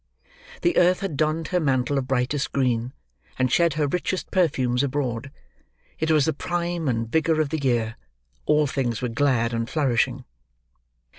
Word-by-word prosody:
The 345 - +2
earth 180 +1 +4
had 195 -6 -3
donned 155 +2 0
her 180 - +1
mantle 135 -2 +1
of 130 - -5
brightest 135 +2 0
green; 125 -3 0 0.5
and 130 -1 +1
shed 170 -1 +3
her 150 -1 +1
richest 180 +4 -2
perfumes 130 -9 +1
abroad. 135 -3 -2 0.7
It 160 - 0
was 155 -3 +4
the 160 - +1
prime 175 -2 -2
and 115 -3 0
vigour 160 +5 +1
of 155 -2 +1
the 160 +1 -2
year; 120 -4 0 0.5
all 150 0 +4
things 130 -4 -2
were 125 - 0
glad 120 -2 +1
and 115 0 -2
flourishing. 135 -7 0
140 Hz, 160 wpm, -24 LUFS, 125-160 Hz, 0.7 s, earth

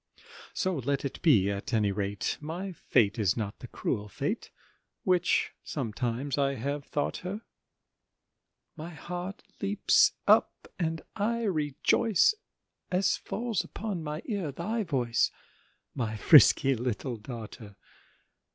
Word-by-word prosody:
So 185 -3 0
let 140 +2 -1
it 135 - -5
be, 105 - +4
at 100 +4 -3
any 105 -2 +2
rate 100 0 -2
My 175 +6 -4
Fate 120 - +1
is 100 -1 +2
not 105 -3 -4
the - - -8
cruel 105 0 -3
Fate - - -3 0.5
Which 180 -1 +2
sometimes 125 +2 -2
I 140 0 +2
have 140 +4 -3
thought 145 - -2
her: 195 +5 -5 1.3
My 160 +2 -7
heart 180 +5 -6 0.2
leaps 200 +1 +4
up, - - +3
and 160 -2 -1
I 230 +3 0
rejoice 190 - +2 0.6
As 185 +1 +2
falls 230 -4 -2
upon 205 -5 -4
my 150 +1 -5
ear 200 - -2
thy 215 - -2
voice, 130 - +1 0.6
My 110 -4 -2
frisky 135 +1 +7
little 125 0 -3
daughter. 110 -2 -9
145 Hz, 125 wpm, -29 LUFS, 115-180 Hz, 1.3 s, frisky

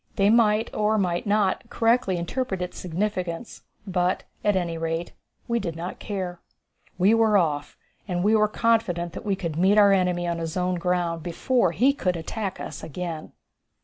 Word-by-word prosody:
They 200 +1 +4
might, 225 -1 +3
or 215 +1 +1
might 180 -1 0
not, 205 -2 +1
correctly 225 -5 +2
interpret 190 +3 -2
its 180 0 -5
significance; 185 +2 -3 0.2
but, 180 -1 0 0.2
at 205 -1 +3
any 175 -3 -1
rate, 165 +1 -3 0.3
we 235 0 +1
did 170 -6 -4
not 170 +2 -6
care. 185 -4 -4 0.6
We 190 +4 +4
were 225 -2 +4
off, 150 -5 -1 0.3
and 175 -2 -1
were 215 +1 +4
confident 210 -7 0
that - - -8
we 200 - +2
could 170 -5 -4
meet 190 +4 +4
our 200 -1 +7
enemy 180 -2 +1
on 170 -1 -1
his 165 +1 -4
own 180 0 0
ground 175 -2 0
before 180 +4 +1
he 250 +11 +3
could 180 -10 -1
attack 195 +4 -4
us - - -7
again. 165 -1 -6
185 Hz, 170 wpm, -25 LUFS, 170-210 Hz, 0.6 s, our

